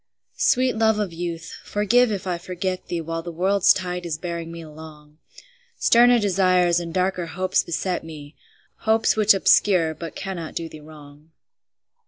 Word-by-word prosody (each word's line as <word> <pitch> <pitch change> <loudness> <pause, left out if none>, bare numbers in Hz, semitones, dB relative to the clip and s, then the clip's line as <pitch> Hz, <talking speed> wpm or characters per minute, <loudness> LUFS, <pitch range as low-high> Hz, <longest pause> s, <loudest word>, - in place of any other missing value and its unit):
Sweet 260 - +2
love 220 -1 +3
of 205 -5 -2
youth, 165 -1 -6
forgive 225 +4 +2
if 195 -3 -4
I 180 -2 -2
forget 185 +1 -4
thee 170 -1 -3
While 165 +1 -4
the 170 +1 -7
world's 190 +3 +3
tide 180 -1 -2
is 165 -3 -4
bearing 170 -1 -5
me 170 0 -8
along; 155 -1 -13 0.6
Sterner 240 +1 +5
desires 185 -4 +2
and 170 -1 -6
darker 185 0 -1
hopes 185 +3 0
beset 180 +2 -3
me, 155 -2 -11 0.4
Hopes 220 0 +2
which 215 -1 +5
obscure 180 -4 +3
but 165 +1 -8
cannot 180 -5 -6
do 165 - -3
thee 155 - -12
wrong. 150 0 -15
175 Hz, 160 wpm, -23 LUFS, 165-195 Hz, 0.6 s, Sterner